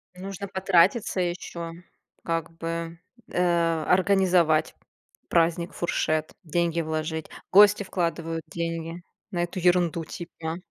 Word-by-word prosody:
Нужно 195 +1 -6
потратиться 190 +1 +2
ещё. 175 -1 -4 0.5
Как 165 -2 -2
бы, 165 0 -4 0.3
э, 170 -2 +2
организовать 180 -4 +3 0.5
праздник, 170 +1 +2
фуршет, 155 -2 -1
деньги 170 +1 0
вложить. 160 0 -3 0.2
Гости 205 +1 +7
вкладывают 165 -3 -2
деньги 165 +1 -4 0.3
на 175 -3 -1
эту 175 +2 -3
ерунду, 175 -2 +2
типа. 165 0 -6
170 Hz, 100 wpm, -26 LUFS, 165-180 Hz, 0.5 s, Гости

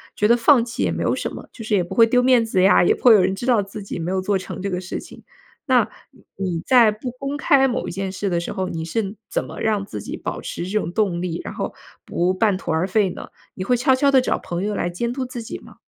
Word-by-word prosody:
觉 210 - +2
得 235 - +5
放 240 0 +4
弃 230 - -5
也 - - +1
没 - - -2
有 - - +1
什 - - -3
么。 - - -9
就 225 - -9
是 215 -1 0
也 185 - +2
不 175 - -7
会 230 -1 +6
丢 250 +2 +3
面 250 -2 +5
子 190 -5 +1
呀， 195 - +6
也 - - +3
不 - - -17
会 245 - +8
有 210 - +6
人 190 +1 +1
知 220 - -6
道 240 -5 +3
自 200 +1 -8
己 195 - -6
没 165 +1 -3
有 190 0 0
做 195 +1 0
成 - - -7
这 195 +1 -3
个 180 0 -2
事 185 - -5
情。 - - -13 0.4
那 - - +4 0.2
你 - - -23
你 180 -4 -2
在 240 -4 +6
不 220 +4 -6
公 275 +3 -5
开 275 -2 +4
某 250 -1 -2
一 - - -4
件 190 +1 -3
事 195 +1 -3
的 175 -2 0
时 170 - -5
候， 190 -1 -2
你 165 -2 -4
是 195 +5 -3
怎 - - -1
么 - - -9
让 210 -3 0
自 105 - -7
己 - - -6
保 - - -5
持 170 - -5
这 205 +3 -1
种 170 - -4
动 180 -3 0
力， 175 -2 -3
然 - - -5
后 - - -4 0.3
不 180 +2 0
半 200 0 +2
途 180 - -4
而 160 +3 +1
废 195 0 +2
呢？ - - -8 0.3
你 185 - -5
会 245 +6 +2
悄 245 +2 +3
悄 280 +2 +3
地 270 - +6
找 255 - 0
朋 175 +1 -4
友 210 0 -2
来 175 - -1
监 235 +8 -3
督 265 0 -3
自 250 -1 -6
己 - - -7
吗？ - - -16
205 Hz, 315 characters per minute, -21 LUFS, 185-240 Hz, 0.4 s, 会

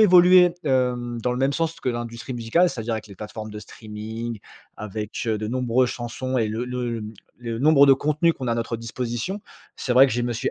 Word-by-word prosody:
évolué, 180 -3 +7
hem, 125 -3 0
dans 125 - 0
le 125 - -2
même 135 +2 +2
sens 165 +2 -2
que - - -3
l'industrie 120 +1 -4
musicale, 120 +10 +2
c'est-à-dire 115 -5 -3
avec 110 - -5
les 100 - -12
plateformes 110 +2 -7
de 105 - -7
streaming, 110 +1 -7 0.4
avec, 105 0 -5
heu, 110 -2 0
de 110 - -3
nombreuses 125 +1 +1
chansons 125 +2 -4
et 115 -3 +1
le 110 +3 -3
le 120 -3 -3 0.3
le 115 -2 -4
nombre 145 -1 +6
de 135 - +8
contenus 150 +4 +2
qu'on 130 -5 -5
a - - +2
à - - +1
notre 115 0 -2
disposition. 120 - -4 0.4
C'est 125 - -2
vrai 130 +2 +7
que - - -3
je 120 +2 0
me 120 0 -1
suis 115 - -2
120 Hz, 215 wpm, -24 LUFS, 115-135 Hz, 0.4 s, de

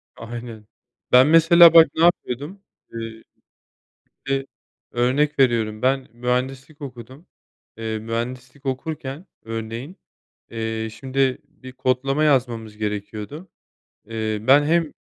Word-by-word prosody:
Aynen. 115 -2 -8 0.5
Ben 130 +3 +7
mesela 165 +1 +7
bak 165 -1 +9
ne 165 - +1
yapıyordum? 170 +2 0 0.3
Eee. 115 -1 -7 1.0
Bir - - -1
de, 135 0 -1 0.5
örnek 135 +5 +1
veriyorum, 110 -4 +2
ben 130 +1 +1
mühendislik 130 +5 -3
okudum. 130 - -10 0.5
Eee, 110 -1 -3
mühendislik 125 +4 -5
okurken 140 +3 -4 0.2
örneğin, 115 - -6 0.5
eee, 110 -1 -3
şimdi 135 0 0
bir 135 -4 -13
kodlama 130 +3 0
yazmamız 120 -7 0
gerekiyordu, 105 - -5 0.6
eee, 110 -1 -3
ben 135 +5 +5
hem, 165 0 +1
130 Hz, 110 wpm, -22 LUFS, 115-145 Hz, 1.0 s, bak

